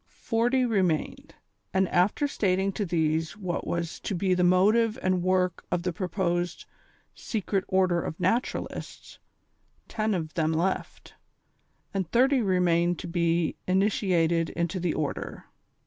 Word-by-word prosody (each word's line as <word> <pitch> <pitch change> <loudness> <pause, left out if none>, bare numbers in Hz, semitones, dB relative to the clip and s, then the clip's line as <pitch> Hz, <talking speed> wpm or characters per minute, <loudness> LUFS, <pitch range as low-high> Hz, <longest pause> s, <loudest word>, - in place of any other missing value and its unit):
Forty 245 +3 +2
remained, 185 -9 -1 0.4
and 190 0 +3
after 195 - +2
stating 195 -6 0
to 200 0 -3
these 160 0 0
what 185 -4 -3
was 170 -1 -3
to 200 - -3
be 185 +1 +1
the 180 0 +2
motive 210 +6 +4
and 185 -1 +1
work 185 -1 +1
of 180 -1 0
the 180 -1 -1
proposed 175 -1 -2 0.3
" - - -39
Secret 200 -3 -2
Order 185 -2 +2
of 160 - -5
Naturalists," 190 +8 -3 0.7
ten 215 -2 -1
of 160 -3 -4
them 160 -1 +1
left, 175 +4 -2 0.8
and 190 -4 -2
thirty 260 +4 +3
remained 175 -3 +2
to - - -7
be 170 -1 0
initiated 180 -4 +2
into 170 +2 -2
the 175 -2 -1
Order. 150 -2 -4
180 Hz, 135 wpm, -27 LUFS, 170-195 Hz, 0.8 s, motive